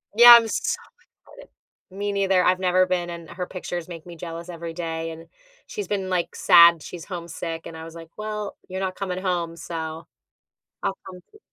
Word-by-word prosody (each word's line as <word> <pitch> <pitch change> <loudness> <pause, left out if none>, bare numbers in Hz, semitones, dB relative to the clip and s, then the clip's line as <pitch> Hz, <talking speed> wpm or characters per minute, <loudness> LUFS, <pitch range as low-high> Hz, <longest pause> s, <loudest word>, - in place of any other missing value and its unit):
Yeah, 240 +1 +11
I'm 230 -1 +5
so - - -1 0.5
excited. - - -15 0.4
Me 205 +2 -3
neither, 195 -2 +2
I've 185 0 +3
never 185 0 +3
been, 180 -1 -1
and 170 -2 -8
her 180 +1 -5
pictures 175 -2 -5
make 165 -3 -9
me 175 -1 -10
jealous 170 +1 -7
every 170 -1 -6
day, 165 -1 -4
and 165 +1 -11 0.4
she's 425 -4 -5
been, 195 -2 -2
like, 180 -2 -1
sad, 170 -1 +7
she's 170 +2 -8
homesick, 170 -2 -6
and 165 - -9
I 160 - -8
was 165 0 -10
like, 165 -1 -10
"Well, 210 -1 -4
you're 185 +1 -5
not 190 -1 -2
coming 185 -2 -4
home, 175 -3 -1
so 160 -1 -6 0.8
I'll 195 - -1
come 180 -1 -10
to" 425 - -17
180 Hz, 195 wpm, -24 LUFS, 165-190 Hz, 0.8 s, Yeah